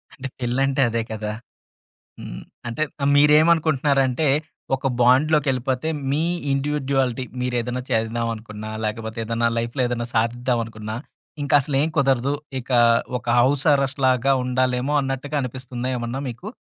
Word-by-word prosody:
అంటే 135 Hz, -1 st, -6 dB
పెళ్ళంటే 135 Hz, +2 st, +1 dB
అదే 115 Hz, 0 st, -1 dB
కదా! 105 Hz, -1 st, -3 dB, 0.9 s
హ్మ్. -, -, -7 dB, 0.3 s
అంటే 120 Hz, +5 st, -4 dB, 0.2 s
ఆహ్, 140 Hz, -, +3 dB
మీరేంమనుకుంటున్నారంటే 150 Hz, -2 st, +4 dB, 0.5 s
ఒక 135 Hz, 0 st, -2 dB
బాండ్‌లోకెళ్ళిపోతే 130 Hz, +1 st, +2 dB, 0.2 s
మీ 150 Hz, +3 st, +1 dB, 0.3 s
ఇండివిడ్యుయాలిటీ, 135 Hz, -3 st, 0 dB, 0.2 s
మీరేద‌న్నా 125 Hz, 0 st, -1 dB
చేద్దాం 115 Hz, +1 st, 0 dB
అనుకున్న, 110 Hz, -1 st, -9 dB, 0.2 s
లేకపోతే 110 Hz, +1 st, -4 dB
ఏద‌న్నా 115 Hz, +1 st, +1 dB
లైఫ్‌లో 120 Hz, +3 st, -1 dB
ఏద‌న్నా 120 Hz, -1 st, -3 dB
సాదిద్దామనుకున్న, 115 Hz, -2 st, -1 dB, 0.5 s
ఇంకసలేం 145 Hz, +1 st, +2 dB
కుదరదు. 135 Hz, -1 st, +2 dB, 0.3 s
ఇక 120 Hz, -, -12 dB, 0.5 s
ఒక 120 Hz, -, -22 dB
హౌస్ 135 Hz, +3 st, +2 dB
అరెస్ట్‌లాగా 135 Hz, -2 st, +2 dB
ఉండాలేమో 125 Hz, +2 st, 0 dB
అన్నట్టుగా 135 Hz, +2 st, -3 dB
అనిపిస్తుందా 125 Hz, 0 st, -5 dB
ఏమన్నా 120 Hz, +3 st, -4 dB
మీకు? 125 Hz, -, -8 dB
130 Hz, 110 wpm, -22 LUFS, 120-140 Hz, 0.9 s, మీరేంమనుకుంటున్నారంటే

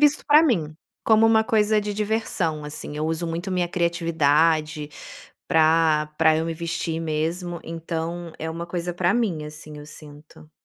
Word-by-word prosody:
visto 295 Hz, 0 st, +3 dB
pra 300 Hz, +2 st, +7 dB
mim, 165 Hz, -, 0 dB, 0.3 s
como 220 Hz, 0 st, +5 dB
uma 220 Hz, 0 st, +4 dB
coisa 215 Hz, -2 st, +2 dB
de 210 Hz, 0 st, -4 dB
diversão, 200 Hz, -7 st, -1 dB
assim, 150 Hz, 0 st, -7 dB
eu 155 Hz, +1 st, -1 dB
uso 165 Hz, +1 st, -2 dB
muito 170 Hz, +4 st, -4 dB
minha 180 Hz, -2 st, 0 dB
criatividade 160 Hz, -3 st, +1 dB, 0.6 s
pra 160 Hz, -2 st, +3 dB
pra 160 Hz, -1 st, +4 dB
eu 160 Hz, -, -1 dB
me 165 Hz, -, -2 dB
vestir 165 Hz, 0 st, -3 dB
mesmo, 165 Hz, +2 st, -2 dB
então, 165 Hz, +1 st, -5 dB
é 160 Hz, -, -3 dB
uma 170 Hz, +1 st, -5 dB
coisa 175 Hz, 0 st, -3 dB
pra 175 Hz, +3 st, +1 dB
mim, 190 Hz, -11 st, -1 dB
assim, 150 Hz, 0 st, -10 dB
eu 145 Hz, -, -10 dB
sinto. 150 Hz, 0 st, -14 dB
165 Hz, 165 wpm, -23 LUFS, 155-180 Hz, 0.6 s, pra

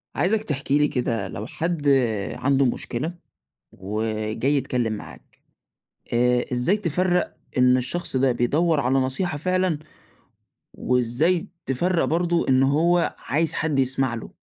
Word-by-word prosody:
عايزك 215 Hz, +4 st, +1 dB
تحكِ 140 Hz, -6 st, -4 dB
لي 150 Hz, +1 st, +4 dB
كده 115 Hz, -7 st, -2 dB
لو 100 Hz, +3 st, -6 dB
حد 165 Hz, -3 st, -2 dB, 0.5 s
عنده 140 Hz, 0 st, +2 dB
مشكلة 125 Hz, +6 st, -2 dB, 0.6 s
وجاي 110 Hz, +6 st, -2 dB
يتكلم 125 Hz, -4 st, -1 dB
معاك. 105 Hz, -, -10 dB, 0.8 s
آآ، 125 Hz, +1 st, +2 dB
إزاي 125 Hz, +12 st, +2 dB
تفرّق 180 Hz, -1 st, 0 dB, 0.2 s
إن 125 Hz, 0 st, +5 dB
الشخص 130 Hz, +3 st, 0 dB
ده 130 Hz, 0 st, +3 dB
بيدّور 150 Hz, +7 st, +1 dB
على 130 Hz, 0 st, +1 dB
نصيحة 140 Hz, +5 st, -1 dB
فعلًا، 185 Hz, 0 st, 0 dB, 0.9 s
وإزاي 125 Hz, -, +1 dB, 0.2 s
تفرّق 170 Hz, +7 st, +1 dB
برضه 170 Hz, +1 st, 0 dB
إن 130 Hz, 0 st, +4 dB
هو 165 Hz, +5 st, +2 dB
عايز 155 Hz, +5 st, 0 dB
حد 155 Hz, -3 st, 0 dB
يسمَع 130 Hz, -1 st, +1 dB
له؟ 115 Hz, -, -8 dB
140 Hz, 125 wpm, -23 LUFS, 125-170 Hz, 0.9 s, إن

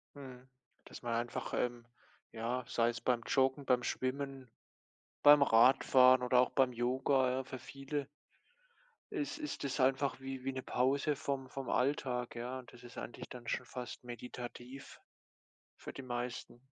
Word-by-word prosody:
mhm, 130 Hz, -2 st, -11 dB, 0.4 s
dass -, -, -11 dB
man 120 Hz, -1 st, -2 dB
einfach, 120 Hz, +1 st, -3 dB
ähm, 120 Hz, -1 st, -1 dB, 0.5 s
ja, 120 Hz, +3 st, -2 dB
sei 115 Hz, 0 st, +2 dB
es 120 Hz, -, -3 dB
beim 125 Hz, -2 st, +1 dB
Joggen, 135 Hz, +1 st, +2 dB
beim 125 Hz, -1 st, +3 dB
Schwimmen, 135 Hz, 0 st, -3 dB, 0.7 s
beim 145 Hz, 0 st, +8 dB
Radfahren 130 Hz, +1 st, +6 dB
oder 125 Hz, 0 st, +4 dB
auch 125 Hz, -, +3 dB
beim 130 Hz, -2 st, +3 dB
Yoga, 130 Hz, +2 st, +1 dB
ja, 130 Hz, +1 st, -1 dB
für 130 Hz, 0 st, -8 dB
viele 140 Hz, +1 st, -5 dB, 1.0 s
ist 300 Hz, -7 st, -3 dB
ist 300 Hz, -, -5 dB
es 140 Hz, +1 st, -2 dB
einfach 135 Hz, +1 st, +2 dB
wie 135 Hz, -1 st, -6 dB
wie 135 Hz, -, -1 dB
'ne 130 Hz, -, -4 dB
Pause 140 Hz, +5 st, +1 dB
vom 135 Hz, -1 st, -3 dB
vom 135 Hz, 0 st, -5 dB
Alltag, 125 Hz, -2 st, 0 dB
ja? 125 Hz, +2 st, -4 dB
Das 120 Hz, 0 st, -15 dB
ist 120 Hz, 0 st, -11 dB
eigentlich -, -, -7 dB
dann 120 Hz, -2 st, -9 dB
schon -, -, -1 dB
fast 125 Hz, 0 st, -7 dB
meditativ 125 Hz, +2 st, -8 dB, 0.8 s
für -, -, -9 dB
die -, -, -8 dB
meisten. 120 Hz, -1 st, -5 dB
130 Hz, 155 wpm, -34 LUFS, 120-135 Hz, 1.0 s, beim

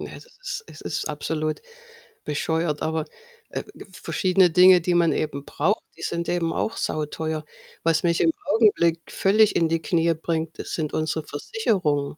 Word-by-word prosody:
Ja, -, -, -7 dB
es -, -, -14 dB
ist -, -, -7 dB
es -, -, -12 dB
ist -, -, -3 dB
absolut 155 Hz, +1 st, -2 dB, 0.7 s
bescheuert. 155 Hz, +1 st, -1 dB
Aber, 160 Hz, -1 st, -1 dB, 0.4 s
äh, -, -, -4 dB, 0.3 s
verschiedene 185 Hz, +1 st, +2 dB
Dinge, 180 Hz, +1 st, +7 dB
die 175 Hz, +1 st, 0 dB
man 170 Hz, -1 st, +4 dB
eben 145 Hz, -2 st, -2 dB
braucht, 190 Hz, +9 st, 0 dB
die -, -, -13 dB
sind 170 Hz, 0 st, -2 dB
eben 170 Hz, -2 st, 0 dB
auch 225 Hz, -, -2 dB
sauteuer. 155 Hz, +1 st, -2 dB, 0.4 s
Was 165 Hz, 0 st, +2 dB
mich 170 Hz, -1 st, +2 dB
im 325 Hz, -, +4 dB
Augenblick 205 Hz, -, +3 dB
völlig 210 Hz, +2 st, +3 dB
in 165 Hz, -, +3 dB
die 165 Hz, 0 st, 0 dB
Knie 170 Hz, -2 st, +2 dB
bringt, 160 Hz, 0 st, -3 dB
das -, -, -6 dB
sind 155 Hz, -3 st, -2 dB
unsere 155 Hz, 0 st, -1 dB
Versicherungen. 150 Hz, -, -1 dB
165 Hz, 165 wpm, -24 LUFS, 155-185 Hz, 0.7 s, Dinge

